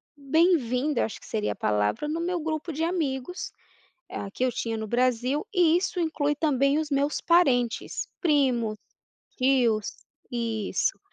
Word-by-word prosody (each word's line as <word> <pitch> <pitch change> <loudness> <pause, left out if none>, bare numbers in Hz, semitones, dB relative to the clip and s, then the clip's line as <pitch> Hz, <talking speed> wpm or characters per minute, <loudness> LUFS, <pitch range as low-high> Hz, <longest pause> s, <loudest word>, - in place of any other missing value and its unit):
bem-vinda, 290 -2 +2
eu - - +2
acho 220 - -7
que - - -16
seria 215 -1 -2
a - - -18
palavra, 105 - 0
no 315 +2 -2
meu 355 0 -1
grupo 315 +1 -3
de 310 +2 -3
amigos, 330 -1 -2 0.6
ah, 200 - -5
que 250 - -3
eu 255 - +1
tinha 225 -1 -3
no 220 0 -4
Brasil 250 - +1
e 340 -3 +4
isso 365 +1 -2
inclui 295 -3 0
também 280 -1 +2
os 310 -1 -3
meus 285 +1 0
parentes, 260 -9 +2
primos, 255 - +2 0.6
tios, 245 -5 +2 0.3
isso. 230 -4 -1
275 Hz, 150 wpm, -26 LUFS, 235-315 Hz, 0.6 s, e